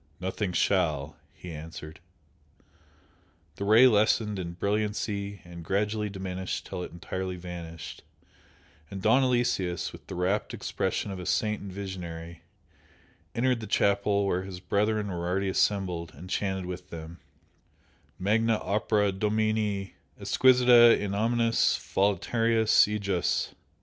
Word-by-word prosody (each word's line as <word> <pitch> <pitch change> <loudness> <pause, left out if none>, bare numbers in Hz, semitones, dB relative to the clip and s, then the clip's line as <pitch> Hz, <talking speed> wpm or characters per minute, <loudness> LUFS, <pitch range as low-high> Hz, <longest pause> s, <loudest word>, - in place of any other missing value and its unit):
"Nothing 95 +1 -2
shall!" 80 -6 +1 0.2
he 90 - -10
answered. 80 0 -9 1.6
The 100 - -3
Ray 110 +5 +7
lessened 105 -2 +3
in 85 -2 -5
brilliancy 100 +1 -2
and 85 -1 -10
gradually 105 +4 -1
diminished 95 -1 -4
till - - -5
it - - -6
entirely 95 +2 -5
vanished, 85 -3 -8 0.9
and 100 - -6
Don 115 +7 +4
Aloysius, 120 - 0
with - - -13
the - - -6
rapt 95 +4 -1
expression 100 - -2
of 95 - -6
a 90 - -6
saint 105 +1 0
and 100 - -7
visionary, 85 -4 -7 0.9
entered 125 0 +1
the 110 - -7
chapel 100 0 +2
where 95 -2 0
his 95 -1 -8
brethren 105 +3 0
were 85 -2 -3
already 95 +2 0
assembled, 90 -4 0
and 90 +6 -10
chanted 95 -2 -1
with 90 0 -7
them 85 0 -9 1.0
"Magna 110 +3 +2
opera 105 -1 +1
Domini; 105 0 -1 0.3
exquisita 125 -2 +6
in 100 -1 -3
omnes 115 +2 +2
voluntates 110 +4 +2
ejus!" 100 -4 -1
100 Hz, 125 wpm, -28 LUFS, 90-105 Hz, 1.6 s, Ray